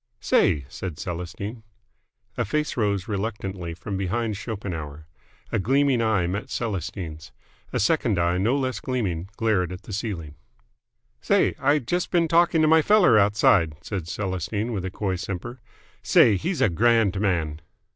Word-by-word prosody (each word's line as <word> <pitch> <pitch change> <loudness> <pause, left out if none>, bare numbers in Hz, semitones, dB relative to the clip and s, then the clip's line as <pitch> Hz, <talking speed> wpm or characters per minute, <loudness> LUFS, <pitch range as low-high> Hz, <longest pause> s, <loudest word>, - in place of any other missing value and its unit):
"Say!" 70 -3 +2
said 85 +2 -6
Celestine. 95 +6 -5 0.7
A 120 - 0
face 150 +7 -1
rose 100 -5 0
reluctantly 100 -5 -4
from 100 +3 -5
behind 110 +3 -1
Schopenhauer. 85 -8 -6 0.5
A - - +1
gleaming 135 +4 +2
eye 110 -6 +2
met 100 +4 -3
Celestine's. 85 - -4 0.4
A - - -1
second 120 - +2
eye 85 +1 +1
no 115 +8 +2
less 130 -5 -2
gleaming 95 -9 -2
glared 100 -6 +1
at 90 +2 -8
the 105 - -8
ceiling. 95 -8 -4 0.9
"Say, - - +2
I 145 +2 +3
just 170 +7 -2
been 170 -2 +2
talking 165 -1 +3
to - - +4
my 160 +1 +6
feller 180 - +5
outside," 100 -6 +3
said 95 -6 -4
Celestine 100 +5 -3
with 95 -3 -3
a - - -2
coy 95 0 -2
simper. 100 +8 -6 0.4
"Say, 105 - +5
he's 175 - -2
a - - +4
grand 110 +1 +2
man!" 80 -6 -1
100 Hz, 150 wpm, -24 LUFS, 90-120 Hz, 0.9 s, my